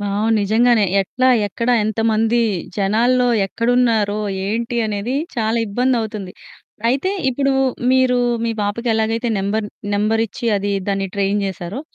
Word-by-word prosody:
Wow! 205 +2 -1
నిజంగానే 220 +2 +3 0.2
ఎట్లా, 255 +7 0 0.2
ఎక్కడ 230 +4 -4 0.2
ఎంతమంది 225 +1 +1 0.4
జనాల్లో 235 +5 +2 0.2
ఎక్కడున్నారో, 230 -2 +1 0.3
ఏంటి 235 +4 -2
అనేది 215 +4 -3 0.2
చాలా 225 0 0
ఇబ్బందవుతుంది. 220 -4 -1 0.6
అయితే 275 +10 0 0.2
ఇప్పుడు 275 +2 0 0.4
మీరు 260 -1 +3 0.3
మీ 230 - 0
పాపకి 205 +4 -2
ఎలాగైతే 225 +2 0
నంబర్ 205 +2 -1 0.3
నంబరిచ్చి 225 +2 -1
అది 200 0 -2 0.2
దాన్ని 195 -1 -1
ట్రైన్ 200 +1 0
చేసారో, 190 +5 -5
220 Hz, 115 wpm, -19 LUFS, 205-240 Hz, 0.6 s, నిజంగానే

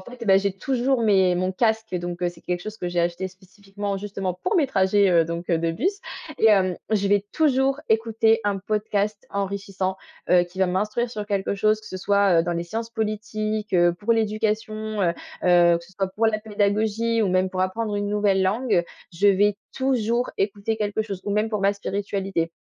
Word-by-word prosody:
fait, 245 +4 -10
bah 195 -1 +6
j'ai 200 0 +1
toujours 255 +5 0
mes 190 -4 +3
mon 185 +1 -1
casque, 220 0 0
donc 175 0 -3
c'est 175 - -11
quelque 175 0 -3
chose 215 +4 -7
que 180 - -4
j'ai 175 0 -3
acheté 175 +2 0
spécifiquement, 195 +2 -7
justement 195 -2 -4
pour 365 - -1
mes 310 -5 +3
trajets, 200 -3 +3
heu, 170 -2 +4
donc, 170 +1 -5
heu, 170 - +2
de 165 0 0
bus. 380 - -1 0.4
Et 225 - +4
hem, 190 -4 +4
je 205 -2 +1
vais 200 0 +2
toujours 270 -2 +2
écouter 225 0 +2
un 205 -1 0
podcast 210 0 -2
enrichissant, 195 -1 -3 0.3
heu, 180 0 +5
qui 175 +1 -9
va 190 - +3
m'instruire 210 +6 -1
sur 215 -3 -5
quelque 200 -1 -1
chose 215 +2 +2
que 215 - -16
ce 185 - -6
soit, 200 -2 +3
heu, - - 0
dans 175 +1 -2
les 170 0 -2
sciences 225 +6 -5
politiques, 215 -1 -3
heu, 175 -1 +4
pour 210 +6 0
l'éducation, 215 -1 -1
heu, 180 - +3 0.4
heu, 175 -1 +5
que 170 - -14
ce 190 - -19
soit 190 0 -2
pour 210 +4 0
la 215 -1 0
pédagogie 220 +2 0
ou 205 - +1
même 185 +1 +2
pour 185 -1 -4
apprendre 205 +3 -1
une 205 0 -1
nouvelle 205 -2 +2
langue. 210 0 +1 0.3
Je 190 +4 +3
vais 200 +1 +3 0.2
toujours 245 -2 0
écouter 205 +2 -1
quelque 210 0 -1
chose 200 -4 -6
ou 205 - -3
même 210 +2 +1
pour 210 -2 -2
ma 200 +1 +3
spiritualité. 195 -3 -3
205 Hz, 205 wpm, -24 LUFS, 185-220 Hz, 0.4 s, bah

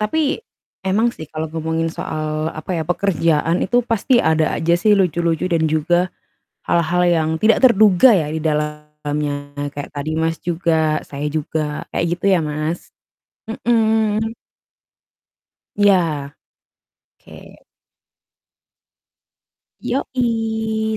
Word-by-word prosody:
Tapi, 285 +7 0 0.5
emang 205 +5 +2
sih, 195 -9 -7
kalau 160 +1 -4
ngomongin 160 0 -2
soal 155 -1 -3
apa 155 +3 -8
ya - - -1
pekerjaan 165 -2 +1
itu 245 +4 +2
pasti 235 +2 +2
ada 160 -1 +2
aja 170 +1 +1
sih 210 +5 +3
lucu-lucu 170 -3 +1
dan 165 -3 +1
juga, 175 +4 +1 0.6
hal-hal 170 +1 +2
yang 160 -2 +2
tidak 225 +1 +5
terduga 215 0 +6
ya 155 -5 0
di 160 - -2
dalamnya 150 -2 -3 0.2
kayak 145 0 -6
tadi 145 +2 -4
Mas, 165 0 0
juga, 160 -3 0
saya 145 +1 -6
juga 150 -1 -2
kayak - - 0
gitu 180 - -7
ya 185 - +4
Mas, 155 +3 -3 0.8
mhm. 220 -2 +2 1.5
Iya, 170 -9 +2 0.9
oke. - - -20 2.5
Yoi, 220 -4 -1
165 Hz, 110 wpm, -19 LUFS, 155-210 Hz, 2.5 s, terduga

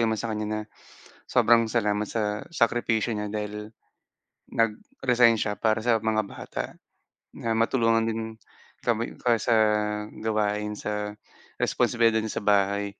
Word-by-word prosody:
naman 110 -1 +1
sa 115 - -3
kanya 105 0 -2
na 110 0 -2 0.7
sobrang 115 0 +6
salamat 105 -2 +1
sa 110 -2 0 0.3
sakripisyo 115 -1 +2
niya 105 0 -3
dahil 105 0 -3 1.1
nag-resign 115 +1 +3
siya 105 -1 0
para 110 -1 +3
sa 120 -2 +3
mga 110 0 +2
bata, - - -5 0.8
na 115 -1 0
matulungan 115 -2 +2
din 115 0 -1 0.6
kami 115 -1 +2 0.2
ka 120 -1 +4
sa 115 - +5 0.7
gawain 105 -1 0
sa 105 - -2 0.7
responsibilidad 115 -2 +2
niya 110 - -4
sa - - -12
bahay. 100 +1 +2
110 Hz, 130 wpm, -26 LUFS, 105-115 Hz, 1.1 s, sobrang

